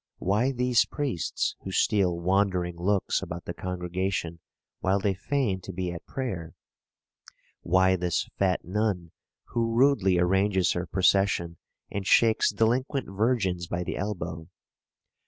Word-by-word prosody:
why 105 +8 +1
these 125 -2 +3
priests 135 - -2
who 95 - -7
steal 95 -3 +2
wandering 90 -1 +1
looks 95 +3 0
about 85 +1 -6
the 85 - -4
congregation 90 -1 -3 0.4
while 95 +2 +1
they 100 0 +1
feign 110 -2 -1
to 95 - -7
be 90 -1 -3
at 85 - -9
prayer? 95 -12 -5 1.1
why 95 +2 +3
this 90 -2 -1
fat 95 -2 0
nun, 95 -3 -1 0.4
who 115 -1 -1
rudely 120 -8 +4
arranges 95 +1 +2
her 90 0 -2
procession 95 -3 +2 0.3
and 100 -1 -4
shakes 115 +1 +4
delinquent 125 +6 0
virgins 95 -6 0
by 90 +1 -2
the - - -4
elbow? 85 -5 -4
95 Hz, 130 wpm, -27 LUFS, 90-105 Hz, 1.1 s, rudely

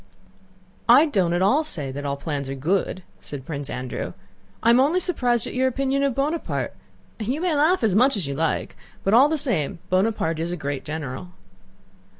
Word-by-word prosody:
"I 265 +6 +8
don't 195 - +1
at 175 +2 +1
all 270 +11 +4
say 150 - -4
that 145 +2 -6
all 140 - -1
the 140 - -16
plans 140 -4 -3
are 135 - -3
good," 185 +6 -1 0.2
said 140 -3 -8
Prince 145 -3 -5
Andrew, 125 0 -4 0.5
"I 230 - +6
am 240 - +5
only 300 +7 +3
surprised 245 - +1
at - - -6
your 260 +1 +2
opinion 270 +1 0
of 275 -3 +1
Bonaparte. 300 +4 -1 0.5
You 245 +7 -2
may 355 -1 0
laugh 310 +2 +3
as 215 -4 +3
much 250 +4 +4
as 185 - 0
you 140 - -3
like, 160 +2 -1 0.3
but 195 - +1
all 265 +6 +7
the 315 - 0
same 220 - -1
Bonaparte 185 -4 +1
is 165 +2 -2
a 175 - -3
great 140 -3 -4
general!" 155 +3 -6
200 Hz, 195 wpm, -24 LUFS, -, 0.5 s, I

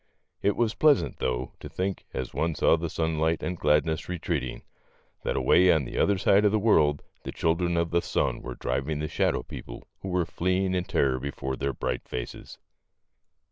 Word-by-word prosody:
It 100 - +2
was 115 -2 +1
pleas 150 -3 +4
ant, - - -7
though, 65 0 -2
to - - -8
think, 95 +1 -3
as 65 -2 -4
one 80 -1 0
saw - - +4
the 85 0 -3
sunlight 80 0 0
and 90 - -2
gladness 80 +1 +1
retreating, 85 -7 -3 0.6
that - - -2
away 85 +8 +5
on 80 -5 +2
the - - -4
other 100 -1 +3
side 100 +2 +4
of 105 - +4
the 110 - +3
world 75 -9 +3 0.2
the - - -6
children 85 +1 0
of 85 0 0
the 85 0 +2
sun - - -1
were 65 -1 -6
driving 70 +4 -2
the 75 +1 -2
shadow 65 - 0
people - - -9
who 95 - -5
were 90 -2 +1
fleeing 95 +2 0
in 90 -1 0
terror 65 -6 +1
before 65 -1 -4
their 70 +1 -1
bright 60 0 -3
faces. - - -6
80 Hz, 190 wpm, -27 LUFS, 70-90 Hz, 0.6 s, away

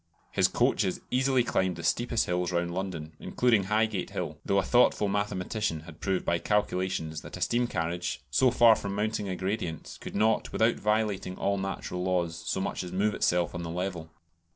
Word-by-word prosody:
His - - +4
coaches 95 - +1
easily 130 0 +3
climbed 95 -5 0
the 85 - -8
steepest 120 +5 +1
hills 90 0 -1
round 85 0 -1
London, 85 -4 -4
including 115 -6 +2
Highgate 105 -1 0
Hill, - - -4
though 100 - +1
a 100 - +3
thoughtful 120 -1 +4
mathematician 100 -3 -1
had 80 0 -13
proved 95 -2 0
by 85 - +1
calculations 95 -6 -1
that - - -9
a - - -10
steam 120 +1 +1
carriage, 85 - -2
so 125 - +4
far 120 -2 +6
from 100 -1 -4
mounting 105 -1 -1
a 95 - -2
gradient, 90 -3 -4
could - - -7
not, 110 +1 +2
without 115 +1 +2
violating 105 -3 0
all 100 0 0
natural 95 -2 -4
laws, 90 -3 0
so - - 0
much 95 - -2
as 90 - -7
move 105 +3 +1
itself 90 -1 +1
on 85 - -4
the 85 - -5
level! 90 -1 -3
95 Hz, 185 wpm, -29 LUFS, 90-105 Hz, -, far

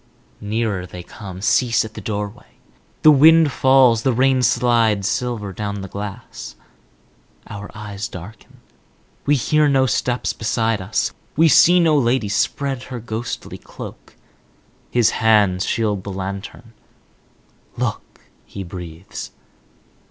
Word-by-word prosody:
Nearer 105 -3 -2
they 90 0 -9
come; 95 -1 -10
cease 115 +1 +2
at 110 - -10
the 105 - -8
doorway. 105 +3 -6 0.5
The 155 - +9
wind 155 +1 +6
falls, 130 -4 +4
the 130 +1 +1
rain 130 +2 +3
slides 115 -5 +2
silver 120 -5 -2
down 100 0 -4
the 95 - -6
glass. 100 - -8 0.9
Our 100 0 -8
eyes 105 -1 -6
darken; 90 +5 -12 0.7
we 145 - +4
hear 150 +4 +2
no 135 -1 +3
steps 125 -1 -1
beside 115 -1 -1
us; 95 +3 -1 0.2
we 165 +1 +6
see 175 +4 +6
no 165 -3 +4
lady 120 -5 +1
spread 135 +5 -1
her 125 -2 -5
ghostly 115 +1 -6
cloak. - - -11 0.7
His 120 -3 +3
hands 105 -4 +2
shield 105 -4 -1
the 100 - -6
lantern. 100 +4 -7 1.0
"Look," - - -4 0.2
he 100 - -8
breathes. 85 -1 -8
110 Hz, 125 wpm, -20 LUFS, 100-125 Hz, 1.0 s, The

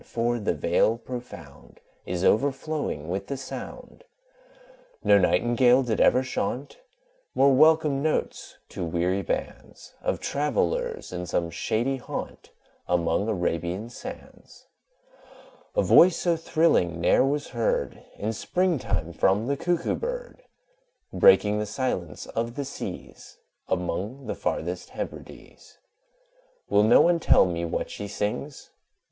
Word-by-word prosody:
for 120 +1 -1
the 100 -5 -1
Vale 85 +9 +2
profound 120 - -10 0.3
Is 90 0 -2
overflowing 135 - 0
with 95 +3 -3
the 140 - -4
sound. 135 - -9 1.0
No 100 - +6
Nightingale 120 +7 +3
did 115 -4 -1
ever 130 - +4
chaunt 130 +2 -4 0.6
More 135 0 +5
welcome 155 0 +4
notes 155 +1 -2
to - - -5
weary 90 +3 0
bands 95 - -6
Of - - -1
travellers 455 - -1
in 90 0 -4
some 85 -1 -1
shady 115 - -1
haunt, 125 - -7 0.4
Among 85 +3 +1
Arabian 90 +2 -2
sands: 255 - -11 1.1
A - - +3
voice 175 -1 +6
so 175 -2 +1
thrilling 155 - +1
ne'er 85 - +4
was 145 +2 -1
heard 120 -3 -1
In 110 +2 -2
spring 180 - 0
time 85 -6 -3
from 95 +6 +2
the 140 +3 0
Cuckoo 170 +3 -1
bird, - - -5 0.7
Breaking 105 - +5
the 105 - -2
silence 100 - -3
of 115 +1 -4
the 140 - -3
seas 135 - -8 0.3
Among 100 +9 -3
the - - -3
farthest - - -3
Hebrides. - - -9 0.9
Will 105 - +4
no 110 +3 +6
one 170 0 +3
tell - - +5
me 85 -1 -2
what 85 - -3
she 105 - -6
sings? 105 +8 -4
120 Hz, 125 wpm, -26 LUFS, 90-145 Hz, 1.1 s, No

